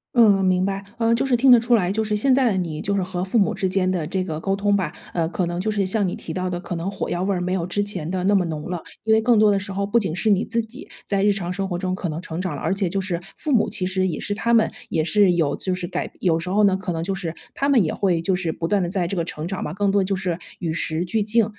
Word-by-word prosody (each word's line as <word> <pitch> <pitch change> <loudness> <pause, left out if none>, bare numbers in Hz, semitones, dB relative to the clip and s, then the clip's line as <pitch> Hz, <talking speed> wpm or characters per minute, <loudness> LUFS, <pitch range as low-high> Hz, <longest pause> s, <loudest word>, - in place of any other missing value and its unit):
嗯， 205 -5 +5
明 185 0 +2
白。 195 0 -2
呃， 230 0 +2
就 230 - +2
是 265 -2 +2
听 260 +2 +5
得 245 - +9
出 240 +1 +3
来， 185 -5 +1
就 220 +2 0
是 210 -1 -1
现 260 +6 +3
在 265 0 +3
的 190 - 0
你 165 -4 -3
就 200 - -1
是 195 - +1
和 180 0 -3
父 190 +5 0
母 200 - +3
之 190 - -1
间 185 0 +1
的 175 -5 -1
这 185 +2 -1
个 155 -4 -4
沟 195 +3 0
通 205 0 +1
吧， 185 -6 -1 0.2
呃， 165 -2 0
可 185 - -1
能 175 +1 -3
就 220 - -1
是 205 -2 0
像 200 +1 0
你 180 - -3
提 160 - -7
到 185 +1 -2
的 175 - -3
可 175 0 -5
能 170 +3 -3
火 195 - -4
药 175 - -1
味 195 +2 0
儿 185 - 0
没 180 +1 -1
有 180 -2 -1
之 205 +3 0
前 185 -6 -4
的 185 0 -2
那 200 - +3
么 195 -3 +4
浓 155 -2 -5
了， 175 -2 -3 0.2
因 220 - +3
为 220 - +4
更 235 0 +4
多 210 -1 +5
的 200 - +2
时 195 0 -6
候 200 +1 -1
不 230 +4 +2
仅 185 -6 -2
是 215 +3 +1
你 200 +2 +3
自 230 0 -1
己 240 +7 -11 0.2
在 200 -1 0
日 205 - +5
常 180 -3 -3
生 195 0 -3
活 175 - -2
中 185 0 -2
可 185 -2 -3
能 155 +1 -4
成 165 +1 -4
长 185 -5 -3
了， - - -7
而 195 - 0
且 195 -2 0
就 195 +3 -1
是 180 -2 -2 0.2
父 305 - -3
母 235 -5 +3
其 185 -3 0
实 185 0 0
也 175 - -3
是 205 - -3
他 230 +3 -1
们 230 -2 +4 0.2
也 160 -2 +1
是 195 +2 +4
有 160 -5 +1
就 185 -1 -2
是 180 -1 -4
改 - - -4
有 165 -3 +2
时 180 +2 -5
候 210 +2 +3
呢， 195 -2 +4
可 190 -1 -4
能 165 -1 -2
就 195 +3 -1
是 170 -4 -4 0.2
他 280 - 0
们 255 -7 +5
也 155 - -1
会 180 -4 +1
就 180 +3 +1
是 175 -3 -1
不 165 +1 -3
断 200 0 +2
地 175 - -1
在 180 -2 -1
这 195 - -3
个 170 - 0
成 160 -1 -5
长 190 +1 -3
嘛， 150 - -4
更 200 0 +1
多 200 0 +3
就 195 +1 0
是 180 -2 -2 0.2
与 165 -3 -3
时 165 +1 -2
俱 220 +4 0
进。 215 +2 +3
190 Hz, 355 characters per minute, -22 LUFS, 175-205 Hz, 0.2 s, 得